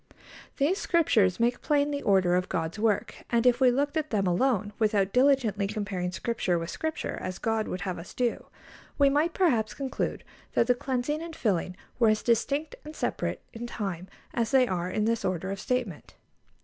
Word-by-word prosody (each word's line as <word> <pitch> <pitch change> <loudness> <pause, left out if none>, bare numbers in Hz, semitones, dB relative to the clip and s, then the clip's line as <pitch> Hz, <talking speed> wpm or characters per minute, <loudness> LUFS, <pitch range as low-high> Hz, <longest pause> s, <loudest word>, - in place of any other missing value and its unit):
These 315 +8 +2
Scriptures 220 - +2
make 240 +1 +1
plain 290 -1 +2
the 285 -1 -2
order 190 -3 +3
of 180 +1 +1
God's 165 +4 -2
work, 215 -2 0
and 235 0 +2
if 250 +1 +4
we 255 - +7
looked 285 +5 0
at 310 -1 -1
them 200 -3 0
alone, 205 +2 +1
without 205 -3 +2
diligently 250 -7 +3
comparing 200 -4 -3
Scripture 185 -3 -1
with 165 0 -4
Scripture, 315 0 -3
as 185 0 -4
God 225 -1 -1
would 180 - -4
have 180 -2 -3
us 170 - -11
do, 245 -2 -1 0.5
we 280 -1 +5
might 310 +4 +1
perhaps 240 - +2
conclude 270 -1 -3 0.3
that - - +4
the 245 - +4
cleansing 260 +4 -2
and 335 -1 -7
filling 185 - -1 0.2
were 230 -3 +5
as 215 0 +1
distinct 280 +6 0
and 305 +1 -9
separate - - -2
in 235 +1 -6
time 190 -6 -4 0.3
as 230 -2 0
they 260 -1 +4
are 180 -2 -2
in 210 +3 0
this 230 0 0
order 185 +1 -2
of 195 - -4
statement. 240 -11 -3
230 Hz, 190 wpm, -28 LUFS, 190-270 Hz, 0.5 s, we